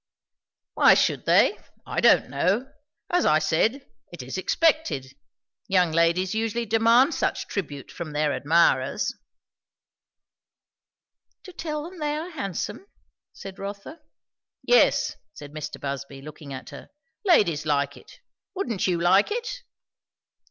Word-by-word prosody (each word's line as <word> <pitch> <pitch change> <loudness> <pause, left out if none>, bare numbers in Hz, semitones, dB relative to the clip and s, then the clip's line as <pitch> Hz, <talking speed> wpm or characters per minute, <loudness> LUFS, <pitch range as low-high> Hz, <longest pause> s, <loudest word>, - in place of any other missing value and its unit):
"Why - - +6
should - - 0
they? - - +4 0.3
I - - -2
don't - - +5
know. 185 - 0 0.4
As 355 0 +2
I 155 - +4
said, 215 - 0 0.3
it 175 -7 -8
is 130 - -7
expected. 185 - 0 0.5
Young 180 -4 +2
ladies 170 +3 +2
usually 225 +1 -1
demand 230 +6 +4
such - - -1
tribute 145 -8 -6
from 170 -3 -7
their 150 -1 0
admirers." 165 +4 +2 2.3
"To 370 - -12
tell 305 -3 -4
them 350 +2 -10
they 295 -1 -1
are 335 +4 -6
handsome?" 200 - -5 0.4
said 195 0 -10
Rotha. 200 +10 -7 0.6
"Yes," - - +3 0.2
said 145 -1 -10
Mr. 155 -1 -6
Busby 140 0 -6
looking 150 0 -11
at 130 -1 -8
her. - - -11 0.3
"Ladies 175 - +3
like 140 -1 0
it. - - -17 0.3
Wouldn't 235 - -2
you 175 -2 0
like 185 +4 +4
it?" 480 +3 -4
190 Hz, 125 wpm, -25 LUFS, -, 2.3 s, Why